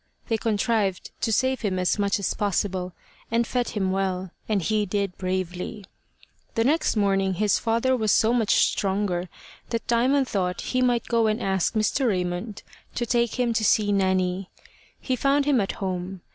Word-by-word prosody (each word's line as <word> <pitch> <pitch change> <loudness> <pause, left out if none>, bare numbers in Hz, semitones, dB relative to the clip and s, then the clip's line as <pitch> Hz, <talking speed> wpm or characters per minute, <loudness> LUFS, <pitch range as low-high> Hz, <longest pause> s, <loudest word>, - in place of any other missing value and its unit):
They 225 - +2
contrived 210 -3 0
to 225 - 0
save 260 +3 +1
him 195 -4 -1
as 180 +3 +1
much 200 +2 +2
as 200 - -1
possible, 190 -2 -1 0.4
and 230 +1 +1
fed 245 +1 -1
him 190 -2 0
well, 190 -1 -2 0.2
and 210 -2 +2
he 215 +4 0
did 200 -1 -1
bravely. 185 +3 -4 0.7
The 225 - +2
next 300 +3 +2
morning 195 -2 +1
his 210 +2 +2
father 235 +3 +1
was 220 -4 +1
so 225 +2 +4
much 230 -4 +2 0.2
stronger 190 -3 -1 0.4
that 230 -1 -2
Diamond 260 +3 +2
thought 180 -4 -1
he 255 - -1
might 245 -2 +2
go 230 -2 +2
and 215 0 0
ask 190 +2 0
Mr. 220 +5 +1
Raymond 185 +1 -2 0.3
to 240 - -1
take 235 0 0
him 240 -2 +2
to 225 -1 0
see 205 0 +3
Nanny. 185 -1 +1 0.5
He 260 - -1
found 275 +3 +2
him 280 -6 +3
at 195 - -2
home. 185 -1 -4
205 Hz, 175 wpm, -25 LUFS, 190-235 Hz, 0.7 s, so